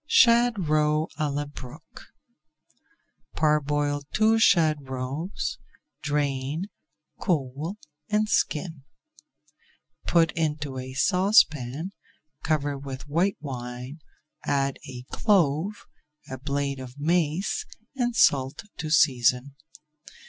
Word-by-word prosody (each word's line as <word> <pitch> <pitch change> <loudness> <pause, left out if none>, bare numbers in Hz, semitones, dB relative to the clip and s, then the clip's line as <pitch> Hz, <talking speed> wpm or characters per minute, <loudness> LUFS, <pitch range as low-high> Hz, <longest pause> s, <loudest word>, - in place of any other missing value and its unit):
SHAD 235 - +4
ROE 150 0 +2
À 150 -1 0
LA 145 +1 -2
BROOKE 145 +1 -12 1.3
Parboil 145 -1 +1
two 220 +1 +3
shad 155 -9 +3
roes, 135 - -4 0.4
drain, 145 +4 -2 0.5
cool, 155 +2 -1 0.3
and 215 0 +2
skin. 160 -5 0 1.3
Put 165 -2 +4
into 150 -4 -2
a 130 0 -7
saucepan, 160 - +3 0.5
cover 145 -2 -1
with 135 0 -7
white 170 +7 +1
wine, 125 +1 -6 0.4
add 140 -1 0
a 125 -1 -8
clove, 190 -1 +1 0.5
a 130 - -5
blade 140 0 -2
of 130 +1 -10
mace, 165 +3 0 0.3
and 245 -2 -1
salt 135 - +3
to 155 - -4
season. 130 -3 +3
150 Hz, 95 wpm, -26 LUFS, 135-170 Hz, 1.3 s, SHAD